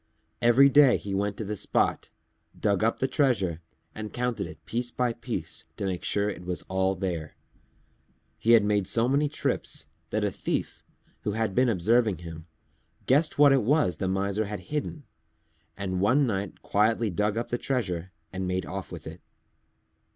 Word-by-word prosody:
Every 120 Hz, +4 st, +6 dB
day 140 Hz, -2 st, +6 dB
he 100 Hz, -, -6 dB
went 100 Hz, +1 st, -1 dB
to 110 Hz, -, -4 dB
the 105 Hz, +2 st, -3 dB
spot, -, -, 0 dB, 0.5 s
dug 100 Hz, -1 st, +1 dB
up 115 Hz, -, +2 dB
the 130 Hz, -, 0 dB
treasure 115 Hz, -, +1 dB, 0.3 s
and 110 Hz, -1 st, -6 dB
counted 125 Hz, -1 st, -2 dB
it -, -, -13 dB
piece 120 Hz, +1 st, -2 dB
by 120 Hz, -1 st, 0 dB
piece 115 Hz, -9 st, -6 dB
to -, -, -3 dB
make 95 Hz, -2 st, -3 dB
sure 100 Hz, 0 st, +1 dB
it 100 Hz, -3 st, -5 dB
was 90 Hz, 0 st, -3 dB
all 95 Hz, 0 st, 0 dB
there. 85 Hz, -5 st, -4 dB, 1.0 s
He 115 Hz, 0 st, +6 dB
made 105 Hz, -2 st, +1 dB
so 115 Hz, +3 st, +2 dB
many 140 Hz, +3 st, +2 dB
trips 155 Hz, -, -2 dB, 0.2 s
that -, -, -1 dB
a -, -, 0 dB
Thief, -, -, -3 dB, 0.4 s
who 105 Hz, -, -2 dB
had 110 Hz, -2 st, -1 dB
been 125 Hz, +4 st, +3 dB
observing 110 Hz, +1 st, +2 dB
him, 80 Hz, -1 st, -9 dB, 0.6 s
guessed 150 Hz, +5 st, +2 dB
what 145 Hz, -1 st, +7 dB
it 135 Hz, -, +4 dB
was 105 Hz, -, +2 dB
the 95 Hz, -, -2 dB
Miser 100 Hz, +3 st, 0 dB
had 105 Hz, 0 st, -5 dB
hidden, 150 Hz, 0 st, -3 dB, 0.7 s
and 95 Hz, -2 st, -2 dB
one 130 Hz, +8 st, +4 dB
night 100 Hz, -4 st, -3 dB
quietly 110 Hz, +1 st, +2 dB
dug 105 Hz, +4 st, 0 dB
up 120 Hz, -, -2 dB
the 120 Hz, -, -1 dB
treasure 95 Hz, -9 st, -2 dB, 0.2 s
and 95 Hz, 0 st, -3 dB
made 90 Hz, 0 st, -1 dB
off 95 Hz, 0 st, -6 dB
with -, -, -8 dB
it. -, -, -9 dB
105 Hz, 175 wpm, -27 LUFS, 95-120 Hz, 1.0 s, what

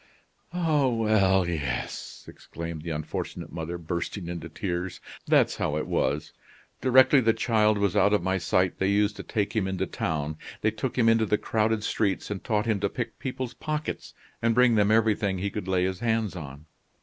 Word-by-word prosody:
"Ah, 160 Hz, -6 st, +2 dB
well 105 Hz, -6 st, +3 dB
yes!" 70 Hz, -7 st, -4 dB
exclaimed 85 Hz, -1 st, -7 dB
the 85 Hz, -, -6 dB
unfortunate 75 Hz, -1 st, -4 dB
mother, 85 Hz, +2 st, -4 dB
bursting 85 Hz, +2 st, -4 dB
into 85 Hz, -1 st, -5 dB
tears. 90 Hz, 0 st, -4 dB, 0.3 s
"That's -, -, +3 dB
how 75 Hz, -, -1 dB
it 75 Hz, -, -2 dB
was. 75 Hz, +2 st, -1 dB, 0.5 s
Directly 130 Hz, +1 st, +6 dB
the 115 Hz, -1 st, +3 dB
child 110 Hz, -2 st, +2 dB
was 100 Hz, -3 st, +1 dB
out 100 Hz, -, +4 dB
of 105 Hz, -4 st, +2 dB
my 95 Hz, +1 st, 0 dB
sight, 90 Hz, +2 st, +1 dB
they 95 Hz, -, +2 dB
used 105 Hz, +1 st, +2 dB
to -, -, -5 dB
take 105 Hz, -1 st, -2 dB
him 105 Hz, -4 st, +1 dB
into 95 Hz, -1 st, -1 dB
town. 75 Hz, -1 st, -3 dB, 0.2 s
They 110 Hz, -, +2 dB
took 110 Hz, +4 st, -4 dB
him 115 Hz, -2 st, +4 dB
into 115 Hz, -1 st, +4 dB
the 105 Hz, -, +2 dB
crowded 110 Hz, 0 st, 0 dB
streets, 105 Hz, -2 st, -1 dB
and 100 Hz, -, -4 dB
taught 105 Hz, -3 st, 0 dB
him 110 Hz, -3 st, +1 dB
to 100 Hz, 0 st, 0 dB
pick 120 Hz, +2 st, -5 dB
people's 130 Hz, -2 st, -4 dB
pockets, 155 Hz, 0 st, -4 dB, 0.3 s
and 115 Hz, -1 st, +2 dB
bring 125 Hz, -1 st, +5 dB
them 105 Hz, -2 st, +3 dB
everything 110 Hz, -3 st, +2 dB
he 100 Hz, +2 st, -2 dB
could 105 Hz, -3 st, -5 dB
lay 95 Hz, -1 st, +2 dB
his 95 Hz, 0 st, -1 dB
hands 110 Hz, -4 st, 0 dB
on. 75 Hz, -3 st, -8 dB
100 Hz, 185 wpm, -27 LUFS, 85-115 Hz, 0.5 s, Directly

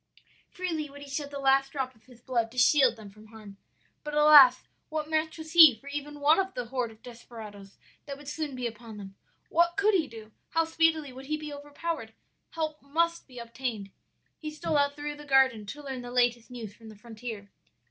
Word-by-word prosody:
"Freely 325 Hz, -5 st, -4 dB
would 285 Hz, +1 st, -11 dB
he -, -, -11 dB
shed 285 Hz, +1 st, -4 dB
the 285 Hz, -, -7 dB
last 270 Hz, 0 st, +2 dB
drop 265 Hz, -3 st, -3 dB
of 220 Hz, -2 st, -28 dB
his 245 Hz, -2 st, -18 dB
blood 235 Hz, -3 st, -1 dB
to 255 Hz, -, -14 dB
shield 260 Hz, -1 st, +5 dB
them 215 Hz, -3 st, -12 dB
from 215 Hz, +2 st, -17 dB
harm, 215 Hz, -3 st, -13 dB, 0.5 s
but, 300 Hz, 0 st, -5 dB
alas! 295 Hz, -4 st, +8 dB, 0.3 s
what 310 Hz, -1 st, -3 dB
match 315 Hz, 0 st, -1 dB
was 315 Hz, 0 st, -9 dB
he 320 Hz, -7 st, +9 dB
for 275 Hz, -, -22 dB
even 295 Hz, +1 st, -6 dB
one 300 Hz, +5 st, +4 dB
of 380 Hz, 0 st, -2 dB
the 245 Hz, -, -3 dB
horde 250 Hz, -2 st, -2 dB
of 220 Hz, 0 st, -18 dB
desperadoes 220 Hz, -5 st, -11 dB, 0.3 s
that 280 Hz, -1 st, -6 dB
would 290 Hz, 0 st, -14 dB
soon 295 Hz, -2 st, -4 dB
be 250 Hz, -1 st, -4 dB
upon 230 Hz, -1 st, -7 dB
them? 195 Hz, -1 st, -9 dB, 0.4 s
what 340 Hz, +2 st, +2 dB
could 415 Hz, +2 st, +3 dB
he 335 Hz, -6 st, +2 dB
do? 220 Hz, -2 st, -12 dB, 0.2 s
how 330 Hz, +1 st, +1 dB
speedily 320 Hz, -3 st, +1 dB
would 265 Hz, +1 st, -11 dB
he 305 Hz, +1 st, -1 dB
be 305 Hz, -1 st, -7 dB
overpowered! 290 Hz, -4 st, -5 dB, 0.3 s
Help 310 Hz, -2 st, -4 dB
must 335 Hz, +4 st, -1 dB
be 255 Hz, -2 st, -15 dB
obtained. 235 Hz, -4 st, -5 dB, 0.5 s
"He 310 Hz, -, -5 dB
stole 305 Hz, +1 st, -3 dB
out 285 Hz, 0 st, +2 dB
through 295 Hz, 0 st, -5 dB
the 295 Hz, -, -11 dB
garden 265 Hz, -6 st, +3 dB
to 295 Hz, +7 st, -8 dB
learn 265 Hz, -2 st, -5 dB
the 245 Hz, -, -8 dB
latest 245 Hz, -1 st, +1 dB
news 230 Hz, -5 st, -8 dB
from 225 Hz, 0 st, -14 dB
the 215 Hz, -, -12 dB
frontier. 220 Hz, -1 st, -9 dB
270 Hz, 210 wpm, -28 LUFS, 230-300 Hz, 0.5 s, he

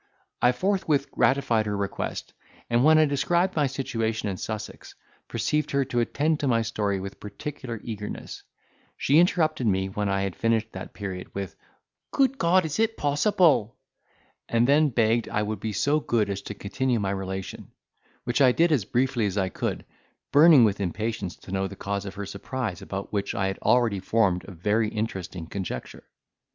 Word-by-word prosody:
I 125 Hz, -, +5 dB
forthwith 155 Hz, -2 st, 0 dB
gratified 120 Hz, -5 st, +2 dB
her 105 Hz, -1 st, -1 dB
request, 100 Hz, -1 st, -4 dB, 0.4 s
and, 120 Hz, +1 st, +3 dB
when 155 Hz, +2 st, +6 dB
I 155 Hz, -, +6 dB
described 170 Hz, +6 st, +1 dB
my 150 Hz, -3 st, +2 dB
situation 115 Hz, -5 st, -2 dB
in 95 Hz, -, -4 dB
Sussex, 110 Hz, +1 st, -6 dB, 0.3 s
perceived 150 Hz, 0 st, -1 dB
her 140 Hz, -1 st, +1 dB
to 120 Hz, -2 st, -1 dB
attend 150 Hz, +6 st, +1 dB
to 140 Hz, -, -1 dB
my 115 Hz, -3 st, +2 dB
story 105 Hz, -3 st, -1 dB
with 95 Hz, +1 st, -7 dB
particular 120 Hz, +1 st, -6 dB
eagerness. 105 Hz, -3 st, -6 dB, 0.6 s
She 145 Hz, +4 st, +4 dB
interrupted 155 Hz, -7 st, +2 dB
me, 95 Hz, -1 st, +1 dB
when 100 Hz, +1 st, -2 dB
I 95 Hz, 0 st, 0 dB
had 95 Hz, -2 st, -3 dB
finished 115 Hz, -1 st, 0 dB
that -, -, -8 dB
period, 95 Hz, -3 st, -6 dB
with, 100 Hz, -2 st, -4 dB, 0.5 s
"Good 270 Hz, -1 st, +1 dB
God! 175 Hz, +1 st, +4 dB
is 155 Hz, +3 st, -3 dB
it 225 Hz, 0 st, +1 dB
possible?" 145 Hz, -, +2 dB, 0.7 s
and 115 Hz, +1 st, +3 dB
then 150 Hz, +2 st, +4 dB
begged 115 Hz, -1 st, +1 dB
I 105 Hz, -, 0 dB
would 105 Hz, -1 st, -3 dB
be 110 Hz, -, -3 dB
so 145 Hz, +10 st, +2 dB
good 110 Hz, -8 st, 0 dB
as 100 Hz, 0 st, -4 dB
to 105 Hz, -, -5 dB
continue 120 Hz, +5 st, -1 dB
my 100 Hz, -2 st, -1 dB
relation; 95 Hz, -1 st, -5 dB, 0.6 s
which 120 Hz, +3 st, 0 dB
I 130 Hz, -2 st, +7 dB
did 170 Hz, +4 st, +3 dB
as 130 Hz, -10 st, +2 dB
briefly 125 Hz, -2 st, +1 dB
as 100 Hz, 0 st, -3 dB
I 95 Hz, -2 st, +1 dB
could, -, -, -3 dB, 0.5 s
burning 150 Hz, -2 st, +8 dB
with 105 Hz, -2 st, +2 dB
impatience 100 Hz, 0 st, -3 dB
to -, -, -13 dB
know 95 Hz, 0 st, 0 dB
the 100 Hz, -, -9 dB
cause 100 Hz, +1 st, -3 dB
of 95 Hz, -, -7 dB
her 100 Hz, -, -5 dB
surprise, 100 Hz, 0 st, -4 dB
about 95 Hz, +1 st, -6 dB
which 100 Hz, -1 st, -1 dB
I 95 Hz, -, 0 dB
had 95 Hz, 0 st, -2 dB
already 115 Hz, -3 st, +2 dB
formed 95 Hz, -2 st, +1 dB
a -, -, -10 dB
very 105 Hz, +5 st, 0 dB
interesting 95 Hz, -6 st, -4 dB
conjecture. 90 Hz, -7 st, -6 dB
115 Hz, 180 wpm, -26 LUFS, 100-140 Hz, 0.7 s, burning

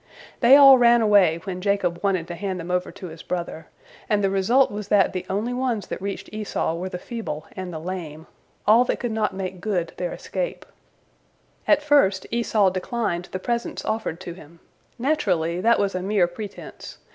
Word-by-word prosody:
They 250 Hz, +2 st, +7 dB
all 275 Hz, -2 st, +9 dB
ran 240 Hz, 0 st, +6 dB
away 195 Hz, -6 st, +4 dB
when 185 Hz, -1 st, -5 dB
Jacob 195 Hz, -3 st, 0 dB
wanted 185 Hz, -4 st, 0 dB
to -, -, -4 dB
hand 190 Hz, 0 st, -4 dB
them 170 Hz, +1 st, -6 dB
over 180 Hz, 0 st, -1 dB
to -, -, -10 dB
his 160 Hz, 0 st, -11 dB
brother, 170 Hz, -2 st, -5 dB, 0.4 s
and 210 Hz, -1 st, +2 dB
the 195 Hz, -, +2 dB
result 230 Hz, +8 st, +3 dB
was 205 Hz, 0 st, -6 dB
that 205 Hz, -2 st, +3 dB
the 185 Hz, -, -5 dB
only 215 Hz, +6 st, -1 dB
ones 245 Hz, -5 st, -1 dB
that -, -, -6 dB
reached 195 Hz, 0 st, -5 dB
Esau 210 Hz, -6 st, -2 dB
were 180 Hz, +3 st, -4 dB
the 180 Hz, -, -5 dB
feeble 180 Hz, -7 st, -6 dB
and 185 Hz, -1 st, -5 dB
the 160 Hz, -, -5 dB
lame, 160 Hz, -2 st, -6 dB, 0.4 s
all 225 Hz, +4 st, +6 dB
that -, -, -1 dB
could 240 Hz, -, -3 dB
not 215 Hz, -3 st, -1 dB
make 185 Hz, -1 st, -5 dB
good 185 Hz, -5 st, -2 dB
their -, -, -3 dB
escape. -, -, -4 dB, 1.0 s
At 300 Hz, -1 st, +4 dB
first 280 Hz, -11 st, +3 dB
Esau 220 Hz, -4 st, +2 dB
declined 185 Hz, -2 st, -2 dB
the -, -, -3 dB
presents 235 Hz, +4 st, -3 dB
offered 215 Hz, -6 st, -2 dB
to 175 Hz, -2 st, -6 dB
him. 170 Hz, -1 st, -15 dB, 0.4 s
Naturally, 185 Hz, -, 0 dB
that 230 Hz, +3 st, +4 dB
was 200 Hz, -1 st, 0 dB
a 185 Hz, -, -2 dB
mere 195 Hz, -1 st, +2 dB
pretense. 200 Hz, +4 st, -9 dB
195 Hz, 190 wpm, -23 LUFS, 180-230 Hz, 1.0 s, all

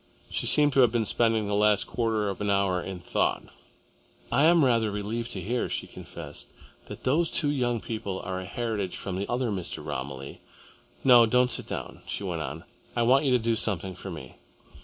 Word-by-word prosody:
She -, -, 0 dB
seemed 145 Hz, -1 st, +5 dB
to 135 Hz, -, +3 dB
have 125 Hz, -3 st, +6 dB
been 115 Hz, -2 st, 0 dB
spending 115 Hz, 0 st, +1 dB
the 100 Hz, -, -2 dB
last 105 Hz, 0 st, +3 dB
quarter 110 Hz, -3 st, -1 dB
of 100 Hz, +1 st, -5 dB
an 105 Hz, -, -1 dB
hour 100 Hz, -2 st, +2 dB
in 95 Hz, 0 st, -6 dB
thought. 90 Hz, -, 0 dB, 0.9 s
"I 145 Hz, -, +4 dB
am 165 Hz, -3 st, +5 dB
rather 115 Hz, -4 st, +2 dB
relieved 105 Hz, +3 st, -3 dB
to 95 Hz, -, -4 dB
hear," 120 Hz, +7 st, -1 dB
she -, -, -2 dB
confessed, -, -, -8 dB, 0.4 s
"that -, -, -9 dB
those 160 Hz, +6 st, +2 dB
two 145 Hz, -3 st, +2 dB
young 120 Hz, -4 st, 0 dB
people 100 Hz, -3 st, -4 dB
are 95 Hz, -1 st, -4 dB
a -, -, -7 dB
heritage 105 Hz, -2 st, -3 dB
from 95 Hz, -, -4 dB
the 100 Hz, +2 st, -3 dB
other 120 Hz, -1 st, 0 dB
Mr. 95 Hz, -4 st, -4 dB
Romilly. 65 Hz, +1 st, -6 dB, 0.6 s
No, 120 Hz, -3 st, +7 dB
don't 125 Hz, +2 st, +3 dB
sit -, -, -1 dB
down," -, -, -6 dB
she -, -, -3 dB
went 85 Hz, -4 st, -3 dB
on. 75 Hz, +2 st, -5 dB, 0.3 s
"I 120 Hz, -, +2 dB
want 130 Hz, +5 st, +4 dB
you 135 Hz, -, +3 dB
to -, -, +6 dB
do 115 Hz, -1 st, 0 dB
something 95 Hz, -4 st, 0 dB
for 95 Hz, +2 st, -8 dB
me. 75 Hz, -8 st, -9 dB
110 Hz, 200 wpm, -27 LUFS, 95-120 Hz, 0.9 s, No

